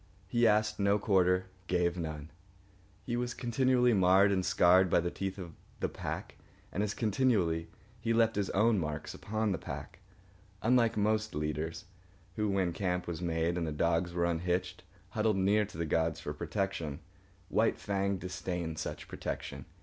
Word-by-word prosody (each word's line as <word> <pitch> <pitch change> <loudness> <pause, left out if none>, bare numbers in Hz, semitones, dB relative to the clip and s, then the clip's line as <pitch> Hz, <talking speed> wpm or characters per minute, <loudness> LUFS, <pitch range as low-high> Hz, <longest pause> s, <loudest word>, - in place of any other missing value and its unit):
He 120 -1 +3
asked 105 0 +2
no 100 +1 +3
quarter, 95 -3 +2 0.2
gave 90 -1 +1
none. 80 -3 -5 0.7
He 120 - -2
was 120 0 -2
continually 125 0 +2
marred 95 +1 +5
and 95 -1 +1
scarred 90 +1 +5
by - - +4
the 85 +1 -1
teeth 95 0 -4
of 85 -4 -7 0.3
the - - -1
pack, - - -6 0.3
and 100 - -1
as 105 -1 -1
continually 100 -8 +1 0.3
he 115 0 -1
left 115 -1 +3
his 100 -1 0
own 105 +1 +3
marks 75 -2 -4
upon 110 0 -2
the 90 - -1
pack. - - -7 0.6
Unlike 115 -1 +3
most 110 +1 +1
leaders, 75 +2 -3 0.5
who, 105 -1 0
when 95 -3 +1
camp 90 0 -1
was 85 -1 -5
made 85 0 0
and 85 - -2
the - - -2
dogs 85 +3 +1
were 85 0 0
unhitched, 90 +1 -1 0.3
huddled 105 +1 +1
near 100 +3 +3
to 100 - -11
the 85 - -1
gods 80 0 0
for 75 -3 -5
protection, 85 -2 -3 0.5
White 110 +1 +2
Fang 100 -1 -1
disdained 90 -3 -4
such - - -5
protection. - - -5
95 Hz, 165 wpm, -32 LUFS, 85-105 Hz, 0.7 s, marred